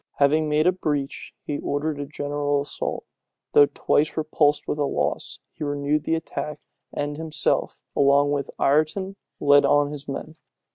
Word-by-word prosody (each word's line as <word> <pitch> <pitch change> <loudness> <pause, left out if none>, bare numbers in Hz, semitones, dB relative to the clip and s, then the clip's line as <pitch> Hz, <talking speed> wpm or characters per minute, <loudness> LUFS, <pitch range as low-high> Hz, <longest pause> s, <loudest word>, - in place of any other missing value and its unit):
Having 150 +2 +3
made 150 +1 +2
a 180 - +6
breach, 150 -6 -3
he 145 - -3
ordered 145 +1 -2
a 145 - -4
general 145 0 -1
assault. 140 - -4 0.5
Though 145 - +7
twice 150 +2 0
repulsed 150 -1 +1
with 150 - -2
loss, 145 - -1
he - - -7
renewed 145 +1 -1
the 165 - +1
attack, 150 -2 -4 0.3
and 145 0 -3
himself, 160 -1 -1
along 140 +1 +4
with 140 -2 -1
Ireton, 155 +7 +1 0.2
led 145 0 +5
on 145 0 +3
his 145 -1 -7
men. 150 +3 -6
145 Hz, 150 wpm, -24 LUFS, 145-155 Hz, 0.5 s, Though